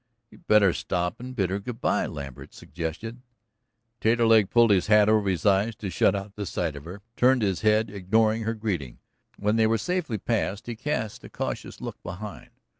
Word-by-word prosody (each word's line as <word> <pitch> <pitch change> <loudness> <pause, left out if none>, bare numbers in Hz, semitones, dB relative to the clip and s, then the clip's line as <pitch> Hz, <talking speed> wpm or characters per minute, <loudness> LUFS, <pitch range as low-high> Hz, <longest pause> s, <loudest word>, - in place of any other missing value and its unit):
"You'd - - -19
better 100 -4 +5
stop 90 -1 -2
and 125 +1 -8
bid 95 -6 0
her 100 - -1
good 115 +3 -7
bye," - - +1
Lambert 70 -4 -8
suggested. 85 - -6 0.8
Taterleg 115 -2 +4
pulled 120 -2 +5
his 95 -1 +3
hat 105 -1 +5
over 105 -2 +3
his 90 -5 -2
eyes 100 +3 +3
to 100 -5 -5
shut 95 - +3
out 100 +1 -5
the 100 -2 -4
sight 80 -4 -2
of 70 +1 -9
her, 95 +4 -9
turned 125 -1 +4
his 95 -3 0
head, 110 0 +2
ignoring 110 +3 +1
her 115 +1 -2
greeting. 90 - -3 0.4
When 105 +2 +1
they 110 -1 +4
were 115 +1 +2
safely 165 - -2
past 105 -1 -2
he 120 - -5
cast 110 -4 -3
a - - -10
cautious - - -5
look - - -7
behind. 95 +4 -8
105 Hz, 190 wpm, -26 LUFS, 95-115 Hz, 0.8 s, better